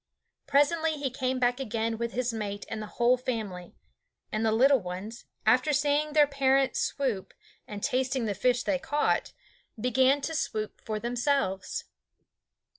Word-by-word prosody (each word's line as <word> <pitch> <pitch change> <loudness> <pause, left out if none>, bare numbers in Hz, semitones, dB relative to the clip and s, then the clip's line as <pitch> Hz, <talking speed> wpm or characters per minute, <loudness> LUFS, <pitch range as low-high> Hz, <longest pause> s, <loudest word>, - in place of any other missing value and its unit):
Presently 315 +3 +3
he 285 -3 -3
came 260 0 -1
back 245 0 +1
again 225 -2 -2
with 235 0 -2
his 245 -1 -1
mate 205 -2 -4
and 220 - -4
the 215 - -6
whole 245 +1 +4
family; 215 -8 -5 0.6
and 215 +1 -1
the 220 - +3
little 265 +5 +5
ones, 195 +5 -7 0.2
after 255 +7 +4
seeing 295 +1 +1
their 300 -1 +6
parents 275 -1 +2
swoop, 245 -9 -2 0.3
and 205 -1 -7
tasting 255 -1 0
the 210 - -1
fish 250 +4 +1
they 285 -3 0
caught, 295 +2 0 0.5
began 260 +4 +3
to 320 - -3
swoop 215 -8 -3
for 215 -1 -3
themselves. 240 -5 -1
250 Hz, 150 wpm, -28 LUFS, 220-275 Hz, 0.6 s, their